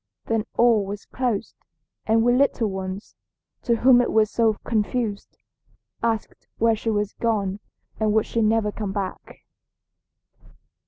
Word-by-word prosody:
Then 225 -2 0
all 230 -3 +4
was 200 +1 -6
closed, 240 -4 -2 0.5
and 225 +1 +3
we 245 +1 +4
little 255 -3 +2
ones, 190 +1 -6 0.5
to 235 - +1
whom 245 +1 +5
it 245 - -1
was 215 -1 +3
so 225 -2 +2
confused, 220 -1 -2 0.6
asked 225 -2 -2
where 230 0 +3
she 225 +1 -3
was 210 -1 -1
gone 205 -4 -1 0.4
and 215 -1 +2
would 220 0 +2
she 230 - -1
never 215 -1 +2
come 205 -2 -4
back. 195 -2 -6
220 Hz, 140 wpm, -23 LUFS, 205-230 Hz, 0.6 s, whom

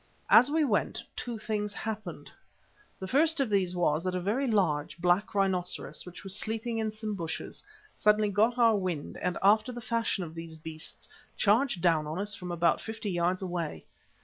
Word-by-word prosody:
As 250 - +8
we 315 +1 +2
went, 225 -8 0
two 240 -2 -4
things 210 -1 -3
happened. 215 -1 -5 0.7
The 190 - -5
first 310 - +3
of 265 -6 +1
these 185 -3 +1
was 165 -2 +1
that 185 0 -1
a - - 0
very 220 +10 0
large, 160 -9 +1
black 180 +4 +1
rhinoceros, 185 -2 -1
which 180 - -10
was 195 -1 -3
sleeping 225 +2 -2
in 220 -1 -1
some 215 0 -4
bushes, 165 -5 -5 0.3
suddenly 210 0 +3
got 220 +5 +2
our 230 -2 +5
wind 180 -6 -3
and, 180 - -1
after 215 +4 +4
the 240 - -6
fashion 230 -4 -1
of 160 -2 -7
these 165 -1 -7
beasts, 160 0 -6 0.3
charged 210 -3 +2
down 160 -4 +3
on 155 +3 -4
us 205 +2 -2
from 180 -3 -6
about 170 -1 +2
fifty 220 -2 -4
yards 180 +2 0
away. 170 - -4
200 Hz, 180 wpm, -29 LUFS, 175-220 Hz, 0.7 s, As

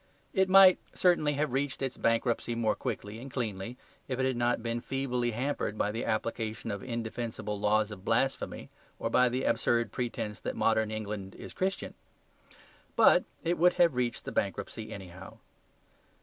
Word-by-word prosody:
It 190 0 +3
might 190 -1 +8 0.2
certainly 170 -5 +3
have 145 -2 -1
reached 135 0 -1
its 130 -2 -2
bankruptcy 115 0 +1
more 115 -2 +2
quickly 105 +2 -4
and 135 +2 -9
cleanly 115 -1 -3 0.3
if 130 - -2
it 130 - +2
had 130 -1 +1
not 120 -1 +1
been 115 0 -2
feebly 125 -2 -1
hampered 120 -2 -2
by 105 - +1
the 115 +3 -3
application 110 0 -2
of 100 -1 -4
indefensible 115 -3 -4
laws 105 +1 +2
of 100 -3 -9
blasphemy 125 +5 -1 0.3
or - - -2
by 125 0 +5
the 130 +2 -2
absurd 120 0 +1
pretence 115 -3 -3
that - - -3
modern 110 -1 +2
England 105 -3 -5
is - - -9
Christian. 190 +1 -2 1.0
But - - +6 0.2
it 170 0 0
would 180 +2 +5
have 170 -4 +4
reached 125 -2 -1
the - - -4
bankruptcy - - -3
anyhow. 95 -1 -9
120 Hz, 165 wpm, -30 LUFS, 110-135 Hz, 1.0 s, might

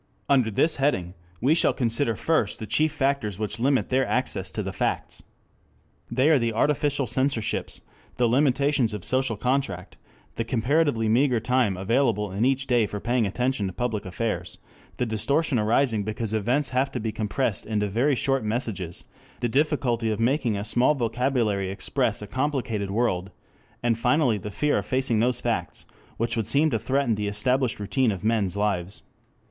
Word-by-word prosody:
Under 130 -5 +3
this 155 +10 +1
heading 115 -11 0 0.3
we 135 +6 +4
shall 165 - +2
consider 115 -1 0
first 135 -5 0
the 110 - -6
chief 155 +8 +2
factors 135 -9 -1
which 110 +2 -3
limit 135 +2 +1
their 130 +1 +2
access - - -1
to - - -4
the - - -5
facts. - - -2 0.9
They 130 +4 +2
are 150 - +5
the 115 -1 0
artificial 145 +3 +1
censorships, 125 -1 -1 0.4
the 125 - +3
limitations 135 -2 +2
of 100 - -7
social 130 -4 0
contact, 125 -7 -2 0.4
the 115 - 0
comparatively 125 +1 +1
meager 125 +2 +3
time 120 -4 +1
available 105 0 +1
in 100 +5 0
each 135 +1 +1
day 120 -5 +2
for 105 - -5
paying 120 0 +1
attention 125 0 -1
to 95 - -5
public 115 -1 -2
affairs, 90 -3 -4 0.4
the 125 - 0
distortion 125 +6 +1
arising 110 +1 +2
because 110 +1 -3
events 125 +7 +1
have 130 +2 0
to - - -2
be 110 0 -2
compressed 110 +1 -2
into 105 -1 0
very 125 +8 +1
short 135 0 0
messages, 105 -6 -3 0.3
the 120 - 0
difficulty 125 -4 +1
of 110 -1 -2
making 120 -2 +1
a 100 - -4
small 125 +6 +3
vocabulary 115 -5 0
express 100 +1 -1
a - - -5
complicated 125 -5 -2
world, 100 -4 0 0.5
and 115 -1 +1
finally 125 -2 +2
the 105 - -6
fear 145 +8 +1
of - - -6
facing 130 -4 +1
those 125 +2 +1
facts - - -2 0.3
which 115 0 -1
would 115 -3 -1
seem 150 +2 +3
to - - 0
threaten 135 -3 +1
the 105 -1 -2
established 125 +4 0
routine 115 +4 +1
of 95 -1 -5
men's 105 -4 +1
lives. 100 -2 -1
120 Hz, 170 wpm, -25 LUFS, 105-135 Hz, 0.9 s, are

